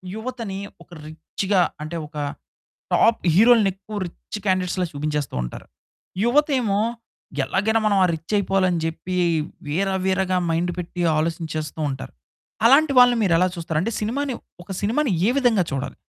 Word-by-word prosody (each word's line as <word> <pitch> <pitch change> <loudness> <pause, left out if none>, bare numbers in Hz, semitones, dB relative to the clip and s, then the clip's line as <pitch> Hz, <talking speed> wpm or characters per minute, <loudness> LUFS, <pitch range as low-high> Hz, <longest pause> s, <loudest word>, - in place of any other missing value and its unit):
యువతని 225 -4 -5 0.2
ఒక - - -31 0.2
రిచ్చ్‌గా 180 +5 -1 0.2
అంటే 160 +2 -6
ఒక 150 0 -12 0.8
టాప్ 225 0 +4
హీరోలని 225 -1 +6
ఎక్కువ 200 +2 -10
రిచ్చ్ 190 - -9
క్యాండిడేట్స్‌లా 185 -1 +1
చూపించేస్తూ 150 - -3
ఉంటారు. - - -8 0.6
యువతేమో 250 -6 +2 0.6
ఎలాగైనా 220 +10 +1
మనం 205 -2 +3
ఆ - - +6
రిచ్ 165 +6 -6
అయిపోవాలని 185 -3 +1
చెప్పి, 175 +3 -4 0.5
వీర 185 +7 0 0.2
వీరగా 190 -1 +1
మైండ్ 170 +2 0
పెట్టి 175 0 -5 0.2
ఆలోచించేస్తూ 160 -1 -3
ఉంటారు. 130 -1 -6 0.5
అలాంటి 280 +4 +6
వాళ్ళని 245 -1 +6
మీరెలా 180 -1 +3
చూస్తారు? 165 -2 -3
అంటే 230 - -1
సినిమాని, 260 +5 -2 0.3
ఒక 195 - -10
సినిమాని 240 +4 +1 0.2
ఏ - - +4
విధంగా 235 -8 +3
చూడాలి? 135 -1 -3
190 Hz, 135 wpm, -23 LUFS, 165-225 Hz, 0.8 s, హీరోలని